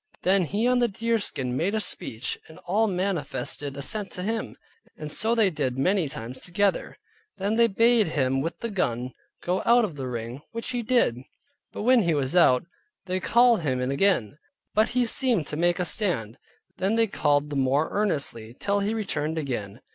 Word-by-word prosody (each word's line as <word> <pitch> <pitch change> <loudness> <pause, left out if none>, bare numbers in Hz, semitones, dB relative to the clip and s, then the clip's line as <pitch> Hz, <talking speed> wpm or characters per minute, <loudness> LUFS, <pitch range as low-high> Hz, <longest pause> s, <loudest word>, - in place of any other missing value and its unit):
Then 190 0 +3
he 205 +8 -1
on 250 0 +3
the 240 - +3
deerskin 205 - -2
made 185 +10 0
a - - +1
speech, 115 - -2
and 160 - -14
all 210 +5 +2
manifested 175 -6 -2
assent 200 +8 -3
to 180 - -3
it; 225 0 -3 0.4
and 150 -1 -7
so 225 +2 +2
they 215 -5 +3
did 135 -5 -2
many 180 +2 +1
times 120 0 -7
together. 195 +2 0 0.4
Then 200 +2 -1
they 230 +1 +4
bade 230 +1 +3
him 135 -3 0
with 165 +4 -4
the 230 - -3
gun 125 - -1 0.3
go 180 +2 0
out 240 0 +5
of 165 -8 -7
the 130 -2 -4
ring, 120 +2 -5
which 230 +2 -4
he 245 -1 -1
did. 230 - +2 0.5
But - - -6
when 250 +1 +5
he 170 -5 +1
was 140 +1 -1
out, 130 -7 +5 0.4
they 185 0 -1
called 235 +2 +4
him 130 -5 -1
in 125 +1 -1
again; 145 - +1 0.3
but 215 +1 +3
he 250 0 +1
seemed 235 - +1
to - - -3
make 175 +2 +2
a 180 - -1
stand; 155 - -1 0.4
then 195 +4 0
they 230 0 +4
called 145 -7 0
the - - -3
more 135 +3 +1
earnestly, 140 - -2
till 200 0 0
he 205 +3 -1
returned 160 -7 -2
again. 120 -7 -4
180 Hz, 190 wpm, -26 LUFS, 135-215 Hz, 0.5 s, out